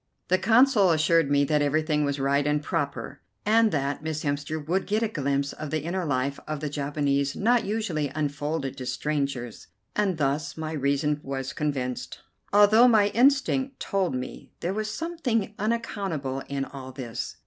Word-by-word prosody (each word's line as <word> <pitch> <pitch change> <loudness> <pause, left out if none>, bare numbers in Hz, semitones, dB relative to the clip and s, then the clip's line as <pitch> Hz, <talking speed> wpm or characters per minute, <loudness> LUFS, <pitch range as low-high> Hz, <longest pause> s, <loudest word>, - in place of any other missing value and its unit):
The 185 +1 +3
Consul 225 -1 +5
assured 160 -1 +3
me 145 0 +4
that 150 +1 +2
everything 150 +1 +1
was 140 -1 -1
right 140 +1 +2
and 150 0 +1
proper, 140 -2 -3 0.2
and 220 +1 +4
that 140 -1 -1
Miss 155 -1 -3
Hemster 145 +2 -2
would 175 +6 -1
get 215 +3 +1
a - - +2
glimpse 140 -6 -1
of 155 - -6
the 155 0 -1
inner 175 +2 -2
life 140 -1 -1
of 155 -1 -3
the 150 -1 -4
Japanese 140 -1 0
not 235 +2 +2
usually 195 -9 -1
unfolded 145 -1 -2
to 130 - -6
strangers, 140 -3 -3 0.3
and 200 -5 +1
thus 145 +1 -1
my 160 0 -4
reason 145 0 0
was 135 -1 -4
convinced, 135 -5 -3 0.3
although 210 +4 +7
my 215 -4 +5
instinct 265 +2 +2
told 190 -8 -1
me 125 0 -6
there 175 +3 -1
was 215 +1 -2
something 250 - -2
unaccountable 195 - -2
in 140 -1 -2
all 130 -1 -9
this. 125 -3 -5
150 Hz, 165 wpm, -26 LUFS, 140-200 Hz, 0.3 s, although